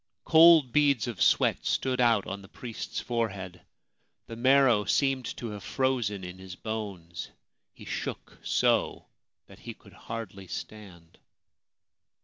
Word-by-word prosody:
Cold 160 -5 +7
beads 140 -6 +3
of 120 -5 -6
sweat - - +3
stood 130 -1 0
out 115 -4 +3
on 100 +1 -6
the 95 - -14
priest's 115 +3 -6
fore 115 -2 -1
head; 95 -3 -9 0.6
the 115 - -8
marrow 130 -3 +4
seemed 130 +6 +1
to 115 -3 -5
have 105 -2 -8
frozen 120 -7 -1
in 90 +1 -8
his 95 -1 -9
bones; 100 -7 -6 0.4
he - - -14
shook - - -6
so - - +1 0.4
that - - -16
he - - -9
could - - -19
hardly 100 -4 -8
stand. 90 -4 -9
110 Hz, 135 wpm, -28 LUFS, 95-130 Hz, 0.6 s, Cold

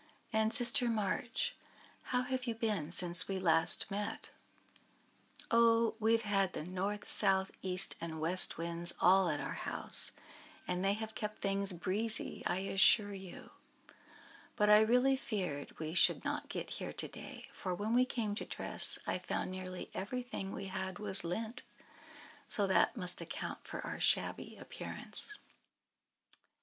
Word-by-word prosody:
"And, 220 0 +1
Sister 245 +2 +3
March, 225 +2 -2 0.5
how 250 0 -1
have 255 0 -4
you 230 - -2
been 210 -9 -3
since 175 0 +7
we 195 - -3
last 165 +1 +3
met?" 205 +1 -5 1.2
"Oh! 230 0 +3
we 220 +1 +2
have 230 0 +1
had 195 -3 0
the - - -5
North, 190 +4 -5
South, 190 -2 +3
East, 185 -1 +2
and 160 -1 -6
West 175 +4 +4
Winds 170 +1 +1
all 185 0 +4
at 150 -2 -2
our - - -5
house, - - 0 0.5
and 180 +1 -3
they 195 +1 +1
have 220 +1 -7
kept 210 0 -6
things 195 0 +1
breezy, 200 +6 0
I 185 - -2
assure 205 +1 +3
you. 190 -2 -11 1.0
But 210 -2 +2
I 210 - +8
really 250 +4 +2
feared 180 - -5
we 160 0 -6
should 185 - +2
not - - -4
get - - -6
here - - -6
to - - -5
day; - - -11
for 185 -2 -5
when 210 +5 -3
we 250 +1 +4
came 230 -5 -3
to 210 - -5
dress - - +6
I - - -3
found - - -4
nearly 185 -1 -8
everything 205 -1 -6
we 195 - -7
had 190 -1 -6
was 200 -2 +1
lent; 220 +8 -4 0.9
so 205 - +4
that 190 +5 +1
must 180 -3 -4
account - - -7
for - - -7
our - - -6
shabby - - -2
appearance." 425 -3 0 1.0
"He! - - -21
200 Hz, 155 wpm, -33 LUFS, 185-225 Hz, 1.2 s, I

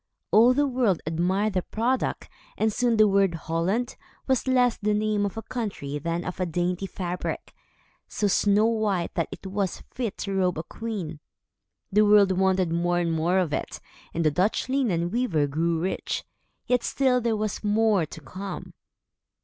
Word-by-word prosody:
All 240 +4 +6
the 290 +1 +3
world 245 - +1
admired 185 +6 0
the 185 - +1
product, 240 +7 -1 0.3
and 220 -1 +1
soon 240 -1 +1
the 215 0 +6
word 195 -3 +3
"Holland" 170 +10 -1 0.3
was 260 -1 0
less 250 -2 +3
the 210 0 0
name 210 -1 +1
of 200 - -8
a 225 - -4
country, 190 - -4
than 170 +3 -2
of 180 - -5
a 185 - 0
dainty 175 +3 -1
fabric, 180 -1 -4 0.5
so 210 - -2
snow 205 +1 +3
white, 215 -6 0
that 170 - -1
it - - -9
was 195 -1 -2
fit 235 -5 -3
to 195 - -4
robe 185 -3 +1
a 160 - -3
queen. 195 -10 -5 0.7
The 210 +2 +4
world 205 -2 +6
wanted 190 -2 +2
more 175 +1 +1
and 170 -1 0
more 165 +3 +1
of 175 -6 +1
it, - - -3 0.3
and 165 0 -1
the 155 - +4
Dutch 185 - +1
linen 210 -11 0
weaver 200 -11 +1
grew 165 +4 0
rich. 185 +3 -2 0.4
Yet 250 -1 +2
still 255 -2 +2
there 230 -2 0
was 215 0 -3
more 210 -4 +2
to 155 - -10
come. 185 +6 -7
195 Hz, 175 wpm, -26 LUFS, 175-220 Hz, 0.7 s, All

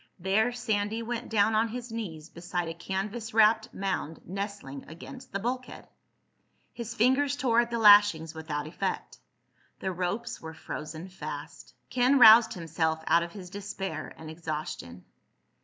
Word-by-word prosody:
There 200 +6 +2
Sandy 220 -2 -1
went 240 +1 -4
down 220 0 +3
on 220 +1 +3
his 240 +1 -7
knees 170 -9 -6
beside 175 0 -4
a 165 - -4
canvas 200 +7 -4
wrapped 220 +1 +4
mound 190 -5 -3
nestling 195 -8 -5
against 180 - -11
the 200 - -1
bulkhead. 250 +5 -4 0.9
His 230 -1 -6
fingers 265 +5 +3
tore 240 -4 +3
at 240 0 +2
the 235 - -2
lashings 205 -7 +6
without 155 -2 -4
effect. 155 - -4 0.6
The 190 - -2
ropes 185 +5 -3
were 160 0 -8
frozen 155 +3 -7
fast. 150 -5 -8 0.2
Ken 255 +2 +4
roused 225 -1 +8
himself 160 -2 -1
out 170 - +4
of 170 0 -5
his 185 -3 -9
despair 195 -5 -5
and 160 -1 -9
exhaustion. 155 - -6
195 Hz, 145 wpm, -28 LUFS, 160-230 Hz, 0.9 s, roused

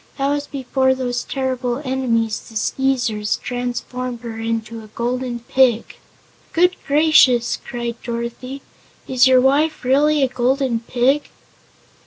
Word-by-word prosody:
that 275 0 0
was 290 0 -1
before 260 -1 0
those 245 -2 -2
terrible 255 -2 -2
enemies, 235 -4 0
the 225 - -14
Skeezers, 240 -3 0
transformed 245 0 -4
her 230 -2 -7
into 225 0 -3
a - - -12
Golden 245 0 -2
Pig." 240 -1 +1 0.6
"Good 360 +2 +3
gracious!" 285 -5 +4
cried 235 -2 -5
Dorothy; 240 +3 -5 0.4
"is 255 0 +4
your 260 -1 +6
wife 290 +4 +2
really 290 +3 +3
a - - +4
Golden 255 -1 0
Pig?" 250 +5 0
255 Hz, 125 wpm, -20 LUFS, 235-270 Hz, 0.6 s, your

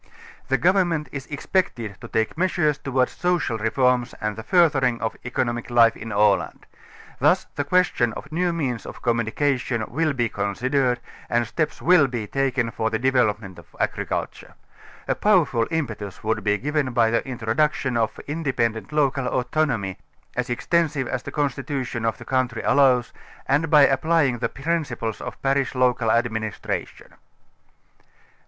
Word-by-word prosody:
The 135 - +2
govern 180 +6 +3
ment 155 -4 -2
is 140 -2 -6
expected 140 - -2
to - - -8
take 110 0 -1
measures 165 -4 +1
towards 130 -2 0
social 175 -10 -1
reforms 125 +2 +1
and 105 -1 -2
the 110 - -6
furthering 135 -5 +3
of 110 - -2
the - - -21
economic 120 -1 -2
life 115 -1 +5
in 115 +1 -7
Aland. 105 0 +1 0.5
Thus - - +3
the 145 - -1
question 150 -7 +2
of 140 - -9
new 175 +2 +1
means 135 -9 -3
of - - -10
communicatioii 120 0 0
will 160 -1 0
be 120 -3 0
considered 125 +6 0 0.3
and 120 0 +2
steps 155 +4 -3
will 170 -5 +6
be 120 -4 -4
taken 130 -1 0
for 110 0 -1
the 110 - -1
developement 110 -7 0
of 85 - -18
agriculture. - - -3 0.5
A - - +2
powerful 165 - +2
impetus 110 - -4
would 110 0 -1
be 105 -1 +2
given 145 +1 -1
by 115 -2 +3
the 115 - +1
introduction 125 +2 0
of 115 -2 0
independent 130 -8 -2
local 140 -3 +1
autonomy, 125 -8 -1 0.4
as 125 0 -2
extensive 145 +1 0
as 125 - -2
the - - -8
constitu 140 -1 -2
tion 120 -2 -4
of 115 - 0
the - - -11
country 130 -3 -1
allows, 130 -4 +3 0.3
and 145 +4 +1
by 150 -2 +7
applying 140 -2 +2
the - - -1
principles 140 -8 -3
of - - -7
parish 135 -1 +1
local 125 -2 +2
administration. 110 -2 -2
125 Hz, 155 wpm, -23 LUFS, 115-145 Hz, 0.5 s, by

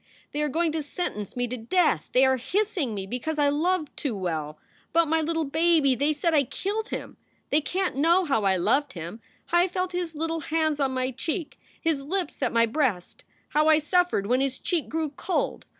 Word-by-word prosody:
They 295 - -2
are 300 - +1
going 325 +3 +1
to 315 0 -2
sentence 285 - -5
me 245 0 0
to 250 +2 -4
death! 240 - +1
They 255 +1 +5
are 265 0 +3
hissing 360 - -1
me 195 -1 -3
because 250 +9 -3
I 290 -1 +3
loved 315 +2 0
too 265 -7 -2
well! 160 -5 -3 0.4
But 335 0 +4
my 320 +1 +2
little 325 +1 0
baby! 315 -1 +3
They 285 +5 +1
said 320 +3 0
I 295 -2 +5
killed 420 - -3
him! - - -6 0.3
They 295 - +4
can 370 +5 -1
t 270 - -5
know 340 +5 +4
how 270 -9 +1
I 195 -1 +3
loved 280 +11 +1
him! 170 +6 -7 0.2
how 345 - +2
I 355 - +4
felt 365 0 -2
his 350 -3 -3
little 325 +2 -2
hands 315 -1 0
on 270 -2 +1
my 255 0 0
cheek, 320 +6 -4 0.2
his 320 -4 0
lips 350 +3 -3
at 255 - +1
my 230 0 +4
breast! 230 - -1 0.3
how 305 +1 +2
I 315 -1 +6
suffered 350 - +1
when 250 +5 +2
his 270 -1 -1
cheek 345 -5 -1
grew 315 -1 -2
cold! 350 +6 -2
300 Hz, 215 wpm, -26 LUFS, 255-335 Hz, 0.4 s, I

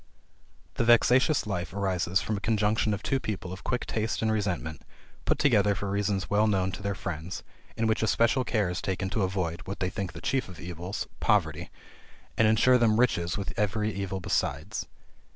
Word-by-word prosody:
The - - +2
vexatious 125 +5 +4
life 95 -4 -3
arises 95 -1 0
from 110 - -1
a - - -3
conjunction 110 -1 +1
of 105 +1 -3
two 135 - +1
people 100 -6 -4
of 95 - -10
quick 125 - -1
taste 110 0 -2
and 110 - +2
resentment, 90 -8 -2 0.4
put - - +2
together 105 -8 +3
for 100 +1 -3
reasons 100 -1 0
well 105 +1 +3
known 95 -2 +1
to 95 - -7
their 100 0 -2
friends, 85 0 -5 0.3
in 115 - +1
which 110 0 +1
especial 115 +3 +3
care 110 -5 +1
is 90 0 -3
taken 95 0 -2
to 110 - 0
avoid 90 -3 -1
(what 100 - -5
they 90 0 -1
think 95 -1 -4
the - - -8
chief 130 -6 -1
of 90 - -11
evils) 90 +2 -5
poverty; - - +1 0.7
and 115 - +4
ensure 125 +4 +5
them 115 -1 +3
riches 85 -8 +1
with 100 - -4
every 105 +1 0
evil 95 -1 -3
besides. 90 - -2
100 Hz, 190 wpm, -28 LUFS, 95-110 Hz, 0.7 s, ensure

